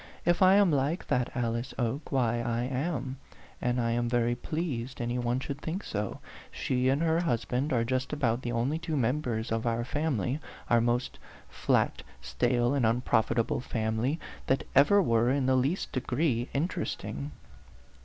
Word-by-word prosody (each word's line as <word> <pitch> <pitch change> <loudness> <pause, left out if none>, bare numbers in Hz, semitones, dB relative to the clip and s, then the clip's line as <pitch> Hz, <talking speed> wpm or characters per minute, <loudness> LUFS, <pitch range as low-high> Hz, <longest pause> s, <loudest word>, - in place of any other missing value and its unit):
"If 175 +2 +2
I 190 +1 +7
am 200 -4 +5
like 145 +5 0
that 125 -1 +1
Alice 115 0 -2
Oke, 135 +4 -2
why 120 -3 +1
I 120 0 -1
am; 130 0 -2 0.4
and 125 0 +1
I 115 -1 +1
am 120 0 0
very 120 0 +2
pleased 130 -2 -4
any 120 +1 -1
one 120 +1 0
should 140 +1 -5
think 175 +5 -3
so. 105 -1 -3 0.3
Ske 125 0 0
and 140 +4 +2
her 165 0 +2
husband 140 -2 0
are 115 -2 +2
just 130 +2 -1
about 130 -5 0
the 120 - -3
only 125 +7 0
two 165 -2 -2
members 120 -3 -1
of 115 +1 0
our 115 0 0
family 140 - -1 0.3
our 120 -1 +5
most 120 +1 0 0.3
flat, - - +1 0.2
stale, 120 - +1
and 140 -3 +1
unprofitable 115 0 +2
family 115 +5 -1 0.3
that 135 - +2
ever 190 +9 +6
were 115 -3 +3
in 135 0 +1
the 130 0 +3
least 135 +9 0
degree 130 -2 0
interesting." 135 - -3
125 Hz, 165 wpm, -29 LUFS, 115-145 Hz, 0.4 s, I